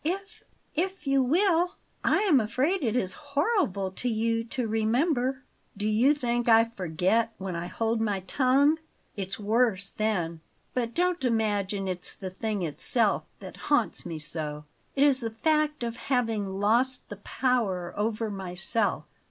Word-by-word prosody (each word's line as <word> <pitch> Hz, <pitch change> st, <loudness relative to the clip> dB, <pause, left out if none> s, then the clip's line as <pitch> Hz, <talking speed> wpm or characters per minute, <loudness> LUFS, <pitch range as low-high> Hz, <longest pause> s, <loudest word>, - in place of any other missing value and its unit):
"If 395 Hz, +6 st, -4 dB, 0.3 s
if 375 Hz, +3 st, -2 dB
you 275 Hz, -1 st, +3 dB
will. 350 Hz, +5 st, +2 dB, 0.3 s
I -, -, +3 dB
am 360 Hz, -10 st, +5 dB
afraid 260 Hz, -, 0 dB
it 230 Hz, -2 st, 0 dB
is 190 Hz, -7 st, 0 dB, 0.2 s
horrible 280 Hz, -, +1 dB
to 245 Hz, +6 st, -2 dB
you 230 Hz, 0 st, 0 dB
to 245 Hz, +1 st, -3 dB
remember." 250 Hz, +4 st, +1 dB, 0.3 s
"Do 210 Hz, +1 st, -1 dB
you 240 Hz, +7 st, +4 dB
think 240 Hz, -3 st, 0 dB
I 225 Hz, 0 st, +7 dB
forget 220 Hz, +2 st, 0 dB
when 190 Hz, -2 st, -4 dB
I 170 Hz, +1 st, -3 dB
hold 225 Hz, +3 st, -1 dB
my 205 Hz, -3 st, 0 dB
tongue? 275 Hz, -, +3 dB, 0.4 s
It's 195 Hz, 0 st, -4 dB
worse 210 Hz, -2 st, +1 dB
then. 175 Hz, -7 st, -1 dB, 0.3 s
But 235 Hz, -2 st, -2 dB
don't 355 Hz, -2 st, +1 dB
imagine 205 Hz, -4 st, 0 dB
it's 180 Hz, -1 st, -3 dB
the 190 Hz, -2 st, -6 dB
thing 210 Hz, 0 st, -2 dB
itself 155 Hz, -4 st, +1 dB, 0.2 s
that -, -, -9 dB
haunts -, -, +2 dB
me 165 Hz, -, -5 dB
so. 150 Hz, -1 st, -4 dB, 0.3 s
It 275 Hz, -, +4 dB
is 280 Hz, -3 st, +5 dB
the 230 Hz, -3 st, -2 dB
fact 300 Hz, +4 st, +1 dB
of 235 Hz, 0 st, -3 dB
having 225 Hz, -7 st, 0 dB
lost 225 Hz, +7 st, +1 dB
the 205 Hz, -, -7 dB
power 205 Hz, -6 st, -1 dB
over 215 Hz, +1 st, -1 dB
myself." 195 Hz, +3 st, -1 dB
225 Hz, 150 wpm, -27 LUFS, 195-270 Hz, 0.4 s, I